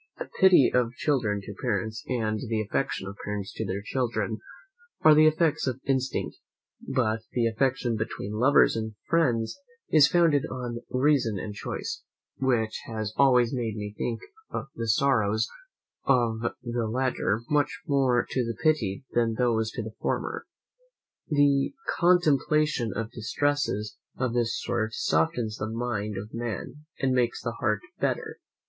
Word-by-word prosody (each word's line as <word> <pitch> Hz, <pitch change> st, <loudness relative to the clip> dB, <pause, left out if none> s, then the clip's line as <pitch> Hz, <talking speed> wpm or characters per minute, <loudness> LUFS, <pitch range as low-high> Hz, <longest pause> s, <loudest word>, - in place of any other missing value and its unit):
The -, -, -7 dB
piety 185 Hz, -9 st, +7 dB
of 125 Hz, -1 st, +2 dB
children 115 Hz, -8 st, 0 dB
to 100 Hz, -, -8 dB
parents, 110 Hz, -1 st, -2 dB
and 110 Hz, -4 st, -1 dB
the 110 Hz, -1 st, 0 dB
affection 105 Hz, -2 st, -2 dB
of 100 Hz, 0 st, -8 dB
parents 105 Hz, -1 st, -4 dB
to -, -, -3 dB
their 100 Hz, +2 st, -3 dB
children, 110 Hz, -2 st, -1 dB, 0.6 s
are 155 Hz, -, +8 dB
the 155 Hz, +1 st, +7 dB
effects 155 Hz, -2 st, +2 dB
of 130 Hz, 0 st, -2 dB
instinct; 135 Hz, -1 st, -1 dB, 0.4 s
but 115 Hz, -5 st, 0 dB
the 120 Hz, -2 st, +1 dB
affection 120 Hz, 0 st, 0 dB
between 110 Hz, -2 st, -4 dB
lovers 130 Hz, +6 st, +4 dB
and 110 Hz, -1 st, -4 dB
friends 130 Hz, -, +1 dB, 0.3 s
is 150 Hz, -2 st, +7 dB
founded 165 Hz, -5 st, +3 dB
on 120 Hz, -2 st, -4 dB
reason 130 Hz, -5 st, +2 dB
and 105 Hz, +3 st, -5 dB
choice, -, -, -5 dB, 0.4 s
which 120 Hz, -5 st, 0 dB
has 110 Hz, -2 st, -4 dB
always 125 Hz, -3 st, +4 dB
made 115 Hz, -4 st, -2 dB
me 105 Hz, -1 st, -5 dB
think 115 Hz, 0 st, -3 dB, 0.5 s
the 115 Hz, 0 st, -4 dB
sorrows 110 Hz, -2 st, +2 dB, 0.6 s
of 120 Hz, -4 st, +2 dB, 0.2 s
the 120 Hz, -2 st, -2 dB
latter 120 Hz, -3 st, 0 dB
much 150 Hz, -1 st, 0 dB
more 130 Hz, -4 st, +2 dB
to 130 Hz, -, 0 dB
be 115 Hz, 0 st, -3 dB
pitied 140 Hz, -9 st, +1 dB
than 115 Hz, -2 st, +1 dB
those 110 Hz, -2 st, +1 dB
of 115 Hz, -, -2 dB
the 110 Hz, -, -6 dB
former. -, -, -2 dB, 0.8 s
The 145 Hz, -, +2 dB, 0.2 s
contemplation 155 Hz, -7 st, +3 dB
of 115 Hz, 0 st, -3 dB
distresses 115 Hz, -2 st, -1 dB, 0.2 s
of 125 Hz, -2 st, -1 dB
this 120 Hz, -1 st, 0 dB
sort 110 Hz, -2 st, -2 dB
softens 105 Hz, +8 st, 0 dB
the 110 Hz, -, -3 dB
mind 110 Hz, -3 st, -3 dB
of 105 Hz, +3 st, -7 dB
man, 120 Hz, +5 st, -5 dB
and 135 Hz, -1 st, +1 dB
makes 120 Hz, -2 st, 0 dB
the 115 Hz, -, -1 dB
heart 105 Hz, -4 st, +1 dB, 0.2 s
better. -, -, -2 dB
120 Hz, 145 wpm, -27 LUFS, 110-135 Hz, 0.8 s, are